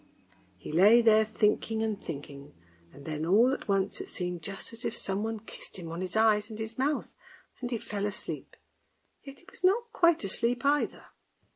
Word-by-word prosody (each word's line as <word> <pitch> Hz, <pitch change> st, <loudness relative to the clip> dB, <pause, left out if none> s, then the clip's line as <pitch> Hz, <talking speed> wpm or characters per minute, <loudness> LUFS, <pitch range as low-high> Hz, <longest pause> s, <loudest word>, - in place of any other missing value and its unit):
He -, -, -8 dB
lay 210 Hz, +9 st, +6 dB
there 220 Hz, -1 st, +6 dB
thinking 220 Hz, +1 st, 0 dB
and 215 Hz, -2 st, -2 dB
thinking, 140 Hz, -, -8 dB, 0.4 s
and 140 Hz, -, -14 dB
then 155 Hz, -1 st, -3 dB
all 220 Hz, +10 st, +4 dB
at -, -, -5 dB
once 195 Hz, -1 st, 0 dB
it -, -, -8 dB
seemed 180 Hz, -2 st, -3 dB
just 195 Hz, +5 st, -5 dB
as 230 Hz, -, -8 dB
if 235 Hz, -, -3 dB
someone 210 Hz, +3 st, -2 dB
kissed 225 Hz, -, -9 dB
him 165 Hz, -3 st, -7 dB
on 170 Hz, +2 st, -5 dB
his 185 Hz, -2 st, -4 dB
eyes 220 Hz, -1 st, +3 dB
and 215 Hz, -, -7 dB
his 220 Hz, 0 st, -5 dB
mouth, 280 Hz, +3 st, -1 dB, 0.5 s
and 245 Hz, -, -4 dB
he 240 Hz, -, -1 dB
fell 205 Hz, -1 st, -3 dB
asleep, 210 Hz, +3 st, -6 dB, 0.7 s
yet 275 Hz, 0 st, -11 dB
he -, -, -22 dB
was -, -, -12 dB
not 460 Hz, +6 st, +2 dB
quite 340 Hz, -, +4 dB
asleep 235 Hz, +6 st, 0 dB
either. 290 Hz, +1 st, +1 dB
215 Hz, 185 wpm, -29 LUFS, 190-235 Hz, 0.7 s, lay